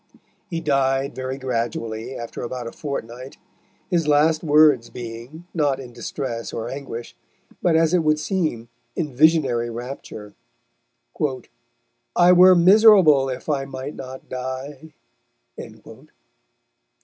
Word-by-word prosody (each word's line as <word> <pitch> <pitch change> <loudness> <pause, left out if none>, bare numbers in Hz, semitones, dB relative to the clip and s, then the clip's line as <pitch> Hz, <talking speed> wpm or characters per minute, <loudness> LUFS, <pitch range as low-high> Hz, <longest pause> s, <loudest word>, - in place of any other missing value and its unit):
He 165 -3 -3
died 135 -2 0
very 130 +1 -5
gradually 115 -1 -4
after 115 -1 -7
about 125 0 -5
a 115 - -6
fortnight, 130 -3 -7 0.5
his 170 -3 +1
last 155 +2 +3
words 150 -5 +4
being, 120 +7 -9
not 145 -5 0
in 125 -3 -10
distress 120 -3 -5
or 115 0 -5
anguish, 130 -4 -7 0.5
but 170 -2 +2
as 165 +1 +3
it 180 - +4
would 155 -1 +2
seem 155 -8 -2 0.3
in 150 -6 -3
visionary 135 -5 +3
rapture: 115 -3 -8 1.8
"I 175 0 +6
were 180 +1 +7
miserable 180 -7 +6
if 125 - -6
I 140 -3 -1
might 135 +2 -7
not 130 0 -9
die." 130 +4 -7
135 Hz, 115 wpm, -22 LUFS, 125-155 Hz, 1.8 s, were